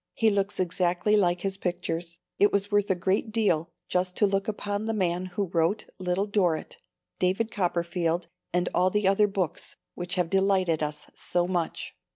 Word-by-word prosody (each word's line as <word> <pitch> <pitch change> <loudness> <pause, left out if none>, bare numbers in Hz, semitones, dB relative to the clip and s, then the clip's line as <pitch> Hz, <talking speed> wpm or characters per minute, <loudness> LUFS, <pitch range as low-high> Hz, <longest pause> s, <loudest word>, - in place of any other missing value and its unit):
He 225 -1 +3
looks 200 -1 -1
exactly 180 +3 +1
like 175 -3 +2
his 195 0 0
pictures. 175 -2 -3 0.2
It 205 - +5
was 200 +1 0
worth 205 0 +2
a 190 - +3
great 190 +5 0
deal 175 -8 +1 0.2
just 180 0 0
to 210 - +4
look 195 +1 0
upon 205 -1 -2
the 225 - 0
man 180 -2 0
who 190 +3 -2
wrote 170 +5 +1
Little 185 +2 0
Dorrit, 190 -6 0 0.4
David 190 +5 +1
Copperfield 170 -2 0 0.2
and 180 0 +1
all 180 +1 +3
the 210 0 +1
other 195 +2 +4
books, 190 -5 -3 0.2
which 180 +1 -4
have 180 -3 0
delighted 190 -4 +2
us 150 0 -3
so 175 0 0
much. 175 -3 -2
185 Hz, 175 wpm, -27 LUFS, 175-200 Hz, 0.4 s, It